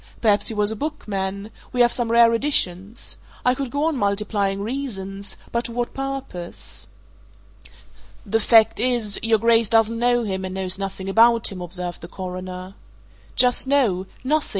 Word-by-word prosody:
Perhaps 210 Hz, -3 st, +3 dB
he 225 Hz, -, +1 dB
was 210 Hz, 0 st, +1 dB
a -, -, -3 dB
bookman 205 Hz, -7 st, -4 dB, 0.2 s
we 250 Hz, -, +1 dB
have 240 Hz, 0 st, +4 dB
some 235 Hz, -2 st, -1 dB
rare 235 Hz, 0 st, +6 dB
editions. 225 Hz, -5 st, 0 dB, 0.3 s
I 250 Hz, -, +4 dB
could 265 Hz, 0 st, -4 dB
go 285 Hz, +4 st, -2 dB
on 320 Hz, -1 st, +1 dB
multiplying 200 Hz, -2 st, -1 dB
reasons 200 Hz, -6 st, -5 dB
but 235 Hz, +1 st, -1 dB
to -, -, -4 dB
what 240 Hz, 0 st, -3 dB
purpose?" 260 Hz, -, -5 dB, 1.4 s
"The 225 Hz, +3 st, +1 dB
fact 225 Hz, 0 st, +4 dB
is, 235 Hz, -4 st, +2 dB
your 225 Hz, 0 st, +3 dB
Grace 230 Hz, 0 st, +3 dB
doesn't 225 Hz, 0 st, +3 dB
know 240 Hz, 0 st, +2 dB
him 190 Hz, -3 st, -3 dB
and 185 Hz, 0 st, -5 dB
knows 190 Hz, 0 st, -1 dB
nothing 195 Hz, -1 st, -5 dB
about 230 Hz, +3 st, +4 dB
him," 185 Hz, -2 st, -7 dB
observed 175 Hz, 0 st, -5 dB
the 170 Hz, -, -8 dB
Coroner. 185 Hz, 0 st, -7 dB, 0.6 s
"Just 250 Hz, +1 st, +5 dB
so 210 Hz, -10 st, +2 dB, 0.2 s
nothing!" 300 Hz, +3 st, 0 dB
220 Hz, 160 wpm, -22 LUFS, 190-240 Hz, 1.4 s, rare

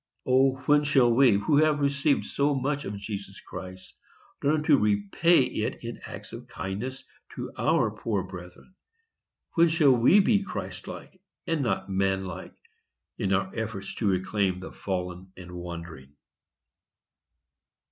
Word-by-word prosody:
O, 130 Hz, +1 st, +4 dB
when 150 Hz, +1 st, +4 dB
shall 135 Hz, -5 st, +4 dB
we, 130 Hz, -1 st, +6 dB
who 100 Hz, +9 st, +2 dB
have 155 Hz, -1 st, +3 dB
received 140 Hz, +1 st, +1 dB
so 140 Hz, 0 st, 0 dB
much 140 Hz, +2 st, -1 dB
of 100 Hz, +1 st, -5 dB
Jesus 100 Hz, -1 st, -7 dB
Christ, 95 Hz, 0 st, -9 dB, 0.5 s
learn 150 Hz, +2 st, +2 dB
to 155 Hz, -1 st, +5 dB
repay 105 Hz, -, +3 dB
it 110 Hz, -3 st, -3 dB
in 115 Hz, 0 st, -6 dB
acts -, -, -9 dB
of -, -, -9 dB
kindness 110 Hz, +8 st, -5 dB, 0.3 s
to -, -, -5 dB
our 145 Hz, -8 st, +2 dB
poor 105 Hz, -2 st, -2 dB
brethren? 90 Hz, -, -11 dB, 0.8 s
When 170 Hz, 0 st, +5 dB
shall 155 Hz, -5 st, +4 dB
we 125 Hz, -, +5 dB
be 205 Hz, +1 st, +3 dB
Christ 200 Hz, -, -6 dB
like, 185 Hz, -, -10 dB, 0.2 s
and 165 Hz, -3 st, 0 dB
not 95 Hz, -7 st, -1 dB
man 95 Hz, 0 st, 0 dB
like, 90 Hz, -2 st, -8 dB, 0.6 s
in 95 Hz, -, 0 dB
our 95 Hz, 0 st, +1 dB
efforts 110 Hz, -3 st, -4 dB
to 110 Hz, -, 0 dB
reclaim 95 Hz, 0 st, 0 dB
the 95 Hz, -, -8 dB
fallen 90 Hz, -1 st, -5 dB
and 90 Hz, -1 st, -10 dB
wandering? 85 Hz, -5 st, -8 dB
110 Hz, 145 wpm, -27 LUFS, 95-140 Hz, 0.8 s, we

